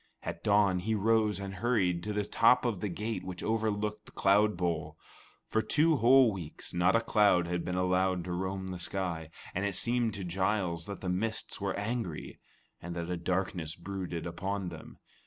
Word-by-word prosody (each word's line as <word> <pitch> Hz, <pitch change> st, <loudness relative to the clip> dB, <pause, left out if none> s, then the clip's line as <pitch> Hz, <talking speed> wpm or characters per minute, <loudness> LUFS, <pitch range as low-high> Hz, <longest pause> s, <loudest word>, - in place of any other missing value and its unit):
At 85 Hz, -, -5 dB
dawn 100 Hz, -3 st, +4 dB
he 110 Hz, +5 st, -1 dB
rose 110 Hz, 0 st, +2 dB
and 100 Hz, 0 st, -5 dB
hurried 95 Hz, -4 st, +1 dB
to 105 Hz, -, -2 dB
the 105 Hz, -1 st, -1 dB
top 125 Hz, +4 st, +4 dB
of 115 Hz, -6 st, 0 dB
the 105 Hz, -, -2 dB
gate 105 Hz, +5 st, -3 dB
which 90 Hz, -1 st, -6 dB
overlooked 105 Hz, -1 st, -1 dB
the -, -, -13 dB
cloud 105 Hz, +1 st, +3 dB
bowl. 85 Hz, -4 st, -2 dB, 0.5 s
For 110 Hz, -, +1 dB
two 155 Hz, +5 st, +3 dB
whole 130 Hz, 0 st, +6 dB
weeks, 85 Hz, -5 st, -7 dB
not 90 Hz, +4 st, +3 dB
a 115 Hz, -, +4 dB
cloud 105 Hz, -6 st, +4 dB
had 90 Hz, 0 st, -2 dB
been 90 Hz, -, -3 dB
allowed 90 Hz, 0 st, +1 dB
to 90 Hz, -, -5 dB
roam 95 Hz, +1 st, -3 dB
the 90 Hz, -1 st, -5 dB
sky, 85 Hz, -3 st, -3 dB, 0.2 s
and 95 Hz, -, -1 dB
it 100 Hz, -2 st, -1 dB
seemed 120 Hz, +1 st, +1 dB
to 100 Hz, -, -5 dB
Giles 90 Hz, -2 st, -1 dB
that 100 Hz, -, -6 dB
the 90 Hz, -, -3 dB
mists 105 Hz, +3 st, -2 dB
were 100 Hz, -1 st, -1 dB
angry, 105 Hz, -6 st, -4 dB, 0.4 s
and 85 Hz, 0 st, -6 dB
that 85 Hz, 0 st, -3 dB
a -, -, 0 dB
darkness 90 Hz, -2 st, -2 dB
brooded 90 Hz, -2 st, -5 dB
upon 95 Hz, +2 st, -3 dB
them. 80 Hz, -2 st, -11 dB
95 Hz, 190 wpm, -31 LUFS, 90-105 Hz, 0.5 s, whole